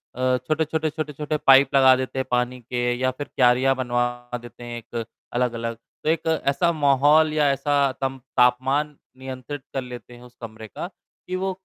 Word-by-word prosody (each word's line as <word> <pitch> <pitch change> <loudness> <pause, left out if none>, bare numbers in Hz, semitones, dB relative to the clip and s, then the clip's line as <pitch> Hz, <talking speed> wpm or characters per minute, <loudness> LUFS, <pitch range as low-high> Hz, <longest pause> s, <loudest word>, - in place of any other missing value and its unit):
अ, 130 0 +1
छोटे-छोटे, 155 +4 -1
छोटे-छोटे 150 -1 -3
पाइप 135 0 +7
लगा 130 -1 +7
देते 130 +1 -3
हैं 130 - -1
पानी 125 +1 0
के 120 +1 -1
या 130 0 +2
फ़िर 145 +3 -7
क्यारिया 130 +1 +4
बनवा 120 -1 -2
देते 120 0 -12
हैं 120 0 -6
एक 115 +1 -5 0.3
अलग-अलग। 115 -1 -1 0.3
तो 155 - 0
एक 165 0 0 0.2
ऐसा 140 +5 +2
माहौल 150 +1 +4
या 150 -2 +3
ऐसा 140 0 +1
तमप 135 -1 -2 0.2
तापमान 135 +4 +2 0.2
नियंत्रित 130 +2 -7
कर 135 - -1
लेते 125 -1 -10
हैं 120 - -14
उस 125 0 -16
कमरे 110 -1 -8
का 170 - -6
कि 180 0 -10
वो 190 +1 -1
130 Hz, 175 wpm, -23 LUFS, 125-145 Hz, 0.3 s, पाइप